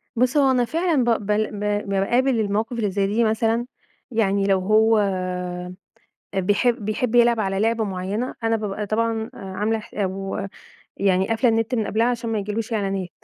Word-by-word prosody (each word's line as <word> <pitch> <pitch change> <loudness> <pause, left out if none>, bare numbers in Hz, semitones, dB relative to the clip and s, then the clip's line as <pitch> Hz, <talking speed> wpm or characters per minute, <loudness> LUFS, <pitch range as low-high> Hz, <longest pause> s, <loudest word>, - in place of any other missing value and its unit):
بُصّ 250 +4 +2
هو 275 -2 +5
أنا 250 -2 +2
فعلًا 325 -1 +1
ب 230 -3 +1
بل 210 +1 0
ب 205 - -7 0.3
باقابل 240 +6 +2
المواقف 215 +2 -1
اللي 210 -4 0
زي 195 +1 0
دي 220 +4 +1
مثلًا، 225 +2 +1 0.5
يعني 200 -3 +1
لو 195 -1 +3
هو 220 +3 +4
آآ، 180 -2 -2 0.6
بيحب 205 +4 +1
بيحب 220 +2 -1
يلعب 235 -1 +5
على 195 -2 -1
لعبة 225 +1 +1
معينة 200 +5 -3
أنا 225 0 +2
بابقى 210 -1 -3
طبعًا 225 +1 -1
عاملة 210 +4 -2
ح 215 - -13
أو 195 0 -3 0.5
يعني 190 0 +2
قافلة 225 +2 +2
النت 225 +2 0
من 220 -3 0
قبلها 225 +4 +1
عشان 235 -1 -1
ما 220 - 0
يجيلهوش 210 +3 -3
إعلانات، 195 -4 -1
215 Hz, 170 wpm, -23 LUFS, 195-230 Hz, 0.6 s, هو